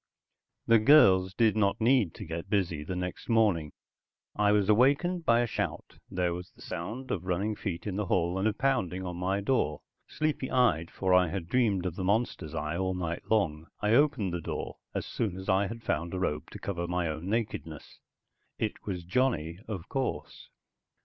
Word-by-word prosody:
The 115 -1 +6
girls 95 -8 +6
did 110 0 +3
not 100 -2 +2
need 115 -6 +3
to 105 - -7
get 85 +3 -6
busy 90 -7 0
the 90 +4 -4
next 90 +4 -5
morning. 100 -10 +2 0.6
I 105 0 +3
was 105 -2 +3
awakened 140 - +3
by 115 0 +5
a - - +2
shout, 115 - -4
there 90 -1 0
was 90 +1 -7
the - - -16
sound 115 +10 -5
of 90 -3 -2
running 100 +4 0
feet 90 -5 -5
in 100 -2 -3
the 105 -3 -1
hall, 90 +1 +1
and 100 - +2
a 110 - +1
pounding 95 -8 0
on 90 -1 -5
my 95 +2 0
door. 100 - 0 0.3
Sleepy 150 -4 -2
eyed, 100 -11 +2
for 95 -1 0
I 90 -1 +5
had 85 0 -4
dreamed 100 -4 +1
of 90 -3 -2
the 95 - -4
monster's 100 -6 -1
eye 75 +1 -2
all 95 0 -1
night 85 -2 -4
long, 80 -8 +1
I 105 - +1
opened 120 - +3
the 85 - -2
door - - -5 0.2
as - - -2
soon 100 -6 -2
as 95 - -8
I 95 0 +3
had 115 +3 -8
found 85 +4 -2
a - - -2
robe 75 -4 -2
to - - -9
cover 85 -3 -3
my 90 -1 -1
own 80 +4 -4
nakedness. 105 -9 -4 0.6
It 110 - -3
was 90 -3 -3
Johnny, 90 -5 0
of 100 -4 -5
course. 135 +1 -4
95 Hz, 195 wpm, -29 LUFS, 85-110 Hz, 0.6 s, The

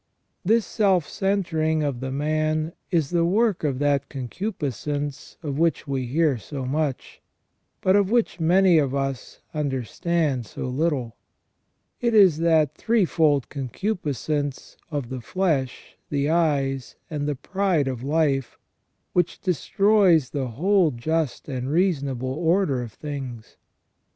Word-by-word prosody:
This 225 +4 +3
self 190 -7 +2
centering 160 -6 0
of 140 -4 -2
the 130 +1 -4
man 155 +3 0 0.2
is 160 -6 +1
the 170 -1 +2
work 205 +2 +2
of 140 -4 0
that 140 -1 +1
concupiscence 145 - -4
of 145 -1 -3
which 165 -2 +1
we 135 -2 -2
hear 145 -1 +2
so 135 +3 -6
much, 140 0 -2 0.6
but 185 +1 +4
of 200 -2 +3
which 230 -6 +1
many 175 +1 +5
of 140 -2 0
us 135 -2 -4
understand 145 -1 -1
so - - -6
little; 130 -3 -1 0.8
it 235 -2 +1
is 185 -7 +6
that 160 -3 +3
threefold 160 - +2
concupiscence 145 - -3
of 145 -6 -3
the 130 -1 -5
flesh, 145 -5 -2
the 140 -1 0
eyes, 140 -6 0 0.2
and 145 -1 -2
the 145 - -1
pride 185 -1 0
of 130 -3 -3
life, 140 -3 0 0.6
which 175 -2 +1
destroys 185 -3 +3
the 135 -3 -2
whole 175 - +2
just 150 +3 -2
and 130 -2 -3
reasonable 140 -7 0
order 165 -3 +1
of 120 -2 -6
things. 130 -4 -7
150 Hz, 130 wpm, -24 LUFS, 135-175 Hz, 0.8 s, is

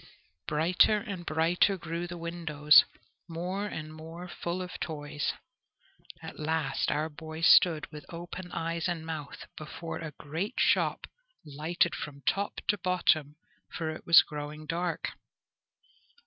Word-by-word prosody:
Brighter 170 +7 +4
and 200 -5 -6
brighter 170 +5 +3
grew 170 0 -4
the 175 0 -7
windows, 160 -3 +5 0.4
more 180 +5 -3
and 155 -5 -6
more 165 +3 -9
full 175 +1 -4
of 180 - -8
toys. 145 -2 -3 0.9
At - - -8
last 155 -2 0
our 150 +3 0
boy 160 +1 -8
stood, 165 -1 +6
with 150 -2 -10
open 175 +1 -7
eyes 165 +1 -2
and 170 -3 -3
mouth, 155 -3 -6
before 160 +2 -6
a 155 -2 -6
great 160 +8 -4
shop - - +2 0.4
lighted 155 +4 0
from 140 -2 -7
top 200 +9 -1
to 210 - +3
bottom, 165 -5 +2 0.4
for 160 -2 -3
it 155 - -9
was 165 -1 +9
growing 150 +1 -7
dark. 170 +2 -2
165 Hz, 135 wpm, -30 LUFS, 155-175 Hz, 0.9 s, was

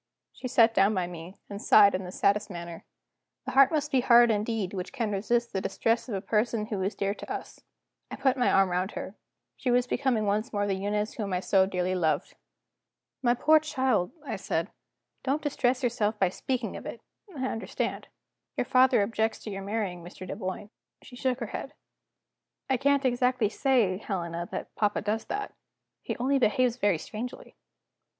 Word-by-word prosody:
She 255 - -6
sat 230 -2 +4
down 200 +1 +3
by 185 -2 0
me, 175 +2 -9
and 200 0 -7
sighed 200 -2 +6
in 185 0 -2
the 180 - -7
saddest 205 +3 +1
manner. 170 -2 -8 0.6
The - - -3
heart 275 0 +6
must 300 -2 -1
be 265 -3 +3
hard 240 -1 +6
indeed 210 -2 -1
which 185 -2 -5
can 235 -6 -2
resist 235 +4 0
the 190 - -1
distress 230 +5 0
of 210 - -2
a 190 - -2
person 215 +1 0
who 210 -4 -3
is 195 +3 -1
dear 200 0 -1
to - - -9
us. - - -6 0.5
I - - -5
put 265 -2 +2
my 250 -2 +2
arm 195 -1 +4
round 185 +3 -1
her; 190 - -6 0.4
she 255 - -3
was 245 0 +3
becoming 250 -4 0
once 210 +4 0
more 205 -1 0
the 200 - 0
Eunice 205 +2 -2
whom 205 -4 -4
I 180 - +1
so 190 0 +3
dearly 185 -1 -1
loved. 165 -4 0 0.9
"My 240 -2 +3
poor 310 +5 +5
child," 260 - 0
I 245 - -3
said, 170 -1 -2 0.5
"don't 280 +3 -1
distress 260 -3 0
yourself 220 -3 0
by 190 -3 +3
speaking 250 +4 -3
of - - -7
it; - - -7 0.4
I 260 - -2
understand. 225 -3 -3 0.5
Your - - +1
father 255 -5 +4
objects 220 +1 0
to 215 - -6
your 195 0 -5
marrying 195 -4 -3
Mr. 180 +1 -10
Dunboyne." 200 +1 -5 0.3
She 245 - -12
shook 255 0 -1
her - - -1
head. - - -5 1.0
"I - - +4
can't 280 +1 +2
exactly 250 -3 +2
say, 220 -6 +2
Helena, 170 -5 -4
that - - -5
papa 210 -1 0
does 215 +2 -1
that. 410 0 -4 0.5
He - - -4
only 270 +3 +1
behaves 245 +1 +2
very 205 -7 +2
strangely." 220 +9 -7
215 Hz, 185 wpm, -28 LUFS, 195-250 Hz, 1.0 s, sighed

